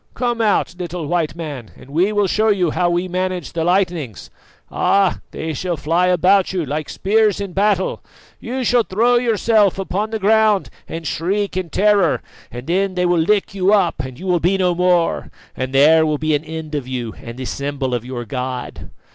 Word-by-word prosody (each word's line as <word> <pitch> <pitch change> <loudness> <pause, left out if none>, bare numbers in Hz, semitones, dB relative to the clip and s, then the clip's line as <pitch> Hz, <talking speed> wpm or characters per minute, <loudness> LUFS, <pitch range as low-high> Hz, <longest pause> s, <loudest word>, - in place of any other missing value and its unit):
Come 240 -1 -1
out, 210 -5 +1
little 175 -2 -4
White 160 -1 -1
Man, 145 -9 -7
and 135 - -15
we 180 +7 +2
will 205 -1 +2
show 215 +4 +1
you 185 -6 +2
how 175 +2 +1
we 175 +1 0
manage 185 -2 -3
the 165 -1 -1
lightnings. 170 - -1 0.4
Ah! 195 -2 +2
they 160 - -5
shall 175 +3 -3
fly 165 +5 +1
about 185 +2 +3
you 180 -4 -2
like 150 +2 -4
spears 210 0 +1
in 200 -3 -5
battle. 195 -1 +1 0.4
You 255 +2 -4
shall 245 0 +3
throw 230 +4 +2
yourself 220 -4 +2
upon 195 +2 -2
the 220 - -2
ground 215 -1 +2 0.2
and 165 0 -6
shriek 195 +6 -1
in 185 -2 -3
terror, 200 -4 +2 0.3
and 120 +2 -8
then 185 +3 0
they 180 0 +1
will 175 -1 +2
lick 200 +3 +1
you 195 +1 +2
up 180 -7 +1
and 130 -3 -5
you 190 - -7
shall 175 -1 +3
be 180 +4 +2
no 180 -2 +2
more, 180 -1 +1 0.3
and 130 +1 -3
there 155 +4 +5
will 155 -1 0
be 155 +1 0
an 145 +2 -1
end 160 -1 -7
of 140 -4 -3
you 120 -4 -4
and 115 +1 -9
the 130 - -5
symbol 140 -1 -3
of 120 -2 -1
your 125 -1 -6
God." 125 +2 -5
180 Hz, 195 wpm, -19 LUFS, 155-200 Hz, 0.4 s, there